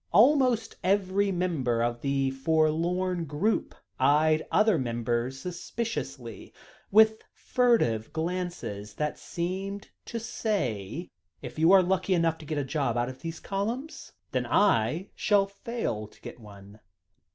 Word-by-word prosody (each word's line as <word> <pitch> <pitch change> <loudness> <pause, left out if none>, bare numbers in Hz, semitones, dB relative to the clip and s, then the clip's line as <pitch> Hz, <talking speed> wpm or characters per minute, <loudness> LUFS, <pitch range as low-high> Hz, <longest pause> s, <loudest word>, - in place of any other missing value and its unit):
Almost 250 -2 +4
every 195 +1 +2
member 150 -11 0
of 120 0 -2
the 135 -1 0
forlorn 165 +5 +1
group 160 +10 -1 0.2
eyed 155 +2 +4
every - - -11
other 215 -4 +4
member 120 0 -1
suspiciously, 135 - -6 0.3
with 220 +1 +5
furtive 230 - +1
glances, 160 - -4
that 150 -1 -2
seemed 190 +3 -4
to 230 - -4
say: 165 - -3 0.3
"If - - -7
you 165 +3 +5
are 195 -1 +7
lucky 185 +1 +1
enough 165 -1 +1
to 155 - -10
get 155 - -2
a 145 - 0
job 135 -3 -1
out 120 +1 0
of 130 0 -10
those 165 0 -5
columns, 230 +10 -4 0.2
then - - -1
I 175 - +2
shall 205 -2 +3
fail 200 - -4
to - - -22
get - - -9
one. 100 -1 -14
170 Hz, 135 wpm, -28 LUFS, 130-200 Hz, 0.3 s, are